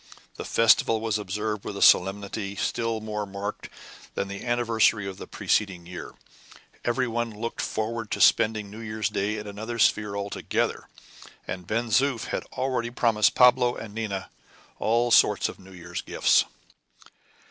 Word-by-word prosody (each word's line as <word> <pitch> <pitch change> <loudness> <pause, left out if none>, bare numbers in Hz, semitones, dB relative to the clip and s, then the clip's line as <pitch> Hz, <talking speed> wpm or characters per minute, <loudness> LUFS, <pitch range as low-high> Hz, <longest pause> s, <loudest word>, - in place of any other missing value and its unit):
The - - -7
festival 115 0 +4
was 110 -1 -1
observed 105 +1 -3
with 100 - -6
a - - -5
solemnity 100 +1 +3
still 115 +2 -1
more 105 -1 -4
marked 100 +1 -6 0.5
than 100 - -2
the 100 0 -6
anniversary 115 -3 +2
of 95 -1 -6
the - - -9
preceding 95 -5 -1
year. 90 +1 -8 0.7
Every 125 +2 0
one 120 0 -2
looked 115 +2 -5
forward 115 0 -3
to - - -3
spending 110 -2 +3
New 110 - -9
Year's 110 -3 -2
Day 105 +2 -1
in 105 - -6
another 110 +3 -6
sphere 105 -2 +2
altogether, 100 0 -2 0.6
and 90 -2 -6
Ben 115 +3 -1
Zoof 135 0 +1
had - - -3
already 130 -3 -1
promised 115 -3 +2
Pablo 125 -1 +5
and 110 -2 -8
Nina 105 -4 -4 0.5
all 120 +2 +1
sorts - - +5
of - - -10
New 95 0 -15
Year's 90 -1 -6
gifts. - - +3
110 Hz, 155 wpm, -26 LUFS, 100-115 Hz, 0.7 s, Pablo